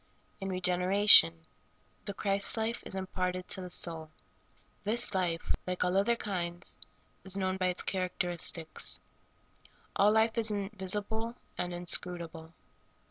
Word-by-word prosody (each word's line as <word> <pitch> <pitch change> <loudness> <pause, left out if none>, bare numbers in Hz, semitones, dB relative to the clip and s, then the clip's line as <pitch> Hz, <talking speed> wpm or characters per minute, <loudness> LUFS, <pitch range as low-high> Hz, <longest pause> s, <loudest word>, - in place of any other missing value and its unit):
In 195 -1 -4
regeneration, 180 - +5 0.6
the 200 - -5
Christ 200 +2 +1
life 225 +1 -1
is - - -4
imparted 185 -1 -3
to 190 - -3
the 180 - -7
soul. 165 -3 +1 0.7
This 220 +1 +4
life, 175 -3 0
like 180 0 -1
all 180 +1 0
other 200 +5 +3
kinds, 175 -6 -4 0.5
is 190 0 0
known 185 -1 0
by 185 -1 +1
its 180 0 +1
char 185 -1 -1
acteristics. 170 -2 -2 1.0
All 205 +1 +5
life 220 +1 +2
is 225 -1 +2
invisible 210 +3 -2 0.2
and 180 - -3
inscrutable. 175 -2 -2
185 Hz, 130 wpm, -31 LUFS, 180-205 Hz, 1.0 s, regeneration